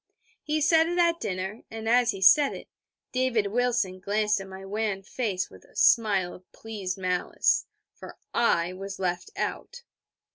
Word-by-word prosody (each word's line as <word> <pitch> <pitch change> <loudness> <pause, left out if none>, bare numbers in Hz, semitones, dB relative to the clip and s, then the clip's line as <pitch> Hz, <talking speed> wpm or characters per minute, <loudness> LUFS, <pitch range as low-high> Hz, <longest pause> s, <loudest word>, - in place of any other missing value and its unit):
He 305 0 -1
said 320 +2 +4
it 350 +1 -2
at 340 -1 +3
dinner; 190 +3 -4
and 225 0 -6
as 245 +1 +4
he 195 -4 -1
said 285 +8 +6
it, - - -10 0.4
David 245 -5 0
Wilson 240 -6 0
glanced 210 +1 0
at 195 - -9
my 190 0 -10
wan 205 -1 -2
face 200 -3 -3
with - - -15
a - - -23
smile 200 -6 +3
of 180 - -16
pleased 200 -5 -5
malice: 180 -1 +1 0.3
for - - -12 0.2
I 180 -7 +2
was 195 +1 -7
left 180 - -2
out. 485 0 -4
210 Hz, 160 wpm, -27 LUFS, 190-245 Hz, 0.4 s, said